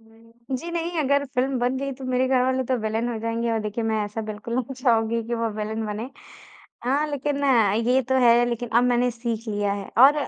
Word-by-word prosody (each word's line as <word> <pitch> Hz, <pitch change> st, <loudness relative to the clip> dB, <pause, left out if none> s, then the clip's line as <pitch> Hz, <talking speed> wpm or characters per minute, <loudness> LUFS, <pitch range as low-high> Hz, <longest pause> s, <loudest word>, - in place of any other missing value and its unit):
जी, 230 Hz, +7 st, -8 dB
नहीं 340 Hz, 0 st, -2 dB
अगर 280 Hz, 0 st, +2 dB
फ़िल्म 260 Hz, +1 st, +1 dB
बन 250 Hz, +2 st, 0 dB
गयी 275 Hz, +1 st, -3 dB
तो 260 Hz, +1 st, -9 dB
मेरे 255 Hz, 0 st, +1 dB
घरवाले 260 Hz, 0 st, +2 dB
तो 255 Hz, +1 st, 0 dB
विलेन 220 Hz, +2 st, -1 dB
हो 225 Hz, -, -4 dB
जाएँगे 230 Hz, +1 st, -1 dB
और 225 Hz, -, +1 dB
देखिए 215 Hz, +2 st, -3 dB
मैं 220 Hz, -1 st, 0 dB
ऐसा 210 Hz, +2 st, -5 dB
बिल्कुल 215 Hz, +3 st, -6 dB
नहीं 255 Hz, +1 st, -2 dB
चाहूँगी 230 Hz, -3 st, +1 dB
कि 235 Hz, -, -2 dB
वो 230 Hz, 0 st, -1 dB
विलेन 220 Hz, +1 st, -3 dB
बने। 215 Hz, +5 st, -5 dB, 0.7 s
हाँ, 285 Hz, +4 st, +1 dB
लेकिन 285 Hz, 0 st, -2 dB, 0.5 s
ये 260 Hz, +1 st, +4 dB
तो 260 Hz, -, +2 dB
है, 240 Hz, 0 st, +6 dB
लेकिन 240 Hz, 0 st, -3 dB
अब 235 Hz, +2 st, +3 dB
मैंने 245 Hz, 0 st, +2 dB
सीख 230 Hz, -1 st, -4 dB
लिया 205 Hz, -1 st, 0 dB
है 200 Hz, -1 st, -6 dB
और 275 Hz, +4 st, +8 dB
240 Hz, 210 wpm, -24 LUFS, 225-260 Hz, 0.7 s, और